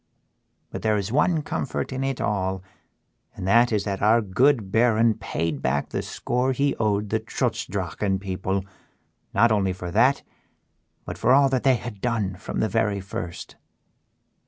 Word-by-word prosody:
But -, -, -5 dB
there 110 Hz, -1 st, +2 dB
is 100 Hz, +1 st, -3 dB
one 150 Hz, +4 st, +2 dB
comfort 135 Hz, -, -3 dB
in 130 Hz, +1 st, -2 dB
it 135 Hz, -1 st, -2 dB
all, 95 Hz, -2 st, -1 dB, 0.7 s
and 90 Hz, -, -5 dB
that 120 Hz, +4 st, +5 dB
is 105 Hz, -2 st, +1 dB
that 100 Hz, -2 st, -3 dB
our 110 Hz, +3 st, +5 dB
good 115 Hz, +1 st, +2 dB
Baron 115 Hz, 0 st, +4 dB
paid 85 Hz, -8 st, -3 dB
back 70 Hz, +2 st, -1 dB
the -, -, -2 dB
score 125 Hz, +2 st, -1 dB
he 140 Hz, +2 st, +1 dB
owed 105 Hz, -2 st, 0 dB
the 110 Hz, -, +1 dB
Trutz 110 Hz, -, -2 dB
Drachen 95 Hz, -2 st, -2 dB
people 95 Hz, 0 st, -3 dB, 0.7 s
not 120 Hz, -1 st, +4 dB
only 95 Hz, -3 st, +1 dB
for 90 Hz, -1 st, -6 dB
that, 125 Hz, +8 st, +3 dB, 0.8 s
but -, -, -7 dB
for 125 Hz, -, +4 dB
all 140 Hz, 0 st, +5 dB
that 130 Hz, -2 st, 0 dB
they 130 Hz, -1 st, +4 dB
had 110 Hz, -3 st, -7 dB
done 110 Hz, -6 st, -1 dB
from 100 Hz, -, -4 dB
the 110 Hz, -, +2 dB
very 110 Hz, -3 st, 0 dB
first." 90 Hz, -3 st, -7 dB
110 Hz, 165 wpm, -24 LUFS, 95-125 Hz, 0.8 s, that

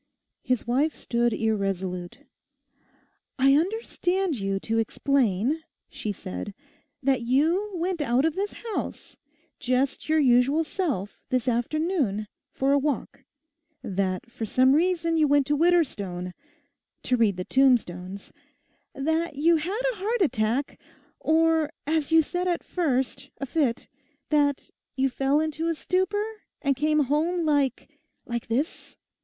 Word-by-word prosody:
His 255 Hz, -5 st, -1 dB
wife 275 Hz, +6 st, +1 dB
stood 235 Hz, 0 st, 0 dB
irresolute. 195 Hz, -5 st, -2 dB, 1.2 s
'I 270 Hz, +1 st, +5 dB
understand 370 Hz, -1 st, 0 dB
you 195 Hz, -3 st, -2 dB
to 225 Hz, 0 st, 0 dB
explain,' 250 Hz, -, +1 dB, 0.3 s
she 215 Hz, -, -4 dB
said, 200 Hz, +1 st, -6 dB, 0.5 s
'that 265 Hz, -2 st, +2 dB
you 315 Hz, -, +1 dB
went 350 Hz, -1 st, -1 dB
out 260 Hz, 0 st, +2 dB
of 320 Hz, -, +1 dB
this 400 Hz, +3 st, -3 dB, 0.2 s
house, -, -, -5 dB, 0.4 s
just 260 Hz, +3 st, 0 dB
your 315 Hz, -, +4 dB
usual 270 Hz, +2 st, +4 dB
self, 295 Hz, -, -3 dB
this 255 Hz, 0 st, 0 dB
afternoon, 245 Hz, -, 0 dB, 0.2 s
for 270 Hz, +1 st, 0 dB
a 285 Hz, -, +4 dB
walk; 290 Hz, 0 st, -3 dB, 0.6 s
that 190 Hz, +3 st, -2 dB
for 230 Hz, -, -6 dB
some 255 Hz, +4 st, +4 dB
reason 335 Hz, +1 st, +2 dB
you 310 Hz, -1 st, +4 dB
went 285 Hz, -1 st, +4 dB
to 295 Hz, +2 st, +1 dB
Widderstone—"to 285 Hz, -, -2 dB
read 220 Hz, -6 st, +2 dB
the 180 Hz, -, -4 dB
tombstones," 200 Hz, -8 st, +1 dB, 0.6 s
that 320 Hz, +3 st, -1 dB
you 325 Hz, +4 st, +4 dB
had 375 Hz, +9 st, -2 dB
a -, -, -12 dB
heart 435 Hz, +4 st, -1 dB
attack, 240 Hz, -1 st, 0 dB, 0.4 s
or, 320 Hz, -1 st, +3 dB, 0.2 s
as 315 Hz, 0 st, 0 dB
you 325 Hz, 0 st, +6 dB
said 355 Hz, +4 st, -2 dB
at 350 Hz, -1 st, 0 dB
first, 265 Hz, -8 st, -1 dB
a 275 Hz, -, -2 dB
fit, 270 Hz, -4 st, 0 dB, 0.4 s
that 290 Hz, -2 st, +1 dB, 0.2 s
you 270 Hz, 0 st, +2 dB
fell 270 Hz, +3 st, +1 dB
into 315 Hz, +1 st, -1 dB
a 330 Hz, -, 0 dB
stupor, 375 Hz, +6 st, 0 dB, 0.3 s
and 280 Hz, -1 st, +1 dB
came 305 Hz, +2 st, +2 dB
home 320 Hz, +5 st, +1 dB
like—like 270 Hz, -4 st, -2 dB
this. 255 Hz, +8 st, -3 dB
280 Hz, 130 wpm, -26 LUFS, 235-325 Hz, 1.2 s, you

